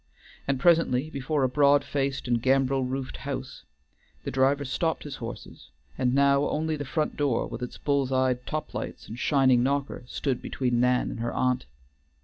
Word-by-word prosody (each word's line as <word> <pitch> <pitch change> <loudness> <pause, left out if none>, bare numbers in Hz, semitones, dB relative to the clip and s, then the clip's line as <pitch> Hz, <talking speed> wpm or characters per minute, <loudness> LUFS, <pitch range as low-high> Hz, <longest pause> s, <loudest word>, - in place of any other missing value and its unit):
And 140 -2 0
presently 155 -3 +3
before 140 +1 -1
a - - +4
broad 145 +2 +4
faced 140 -2 -2
and 120 -1 +1
gambrel 135 +1 +2
roofed 130 +1 -4
house, 135 -1 -6 0.6
the - - -4
driver 135 +2 +2
stopped 160 +5 -1
his 145 -2 -7
horses, 115 -1 -9 0.3
and 125 0 +1
now 140 +1 +4
only 155 +1 -1
the 145 - -4
front 155 +3 -1
door 140 -5 +1
with - - -7
its 125 - -5
bull's 140 -2 0
eyed 130 -1 +1
top 155 0 -4
lights - - -6
and 115 +3 -8
shining 130 -4 +4
knocker 140 +1 -1
stood 130 -1 -2
between 125 -2 -1
Nan 125 0 +2
and - - -6
her 120 +1 -2
aunt. 125 0 0
135 Hz, 175 wpm, -27 LUFS, 125-145 Hz, 0.6 s, a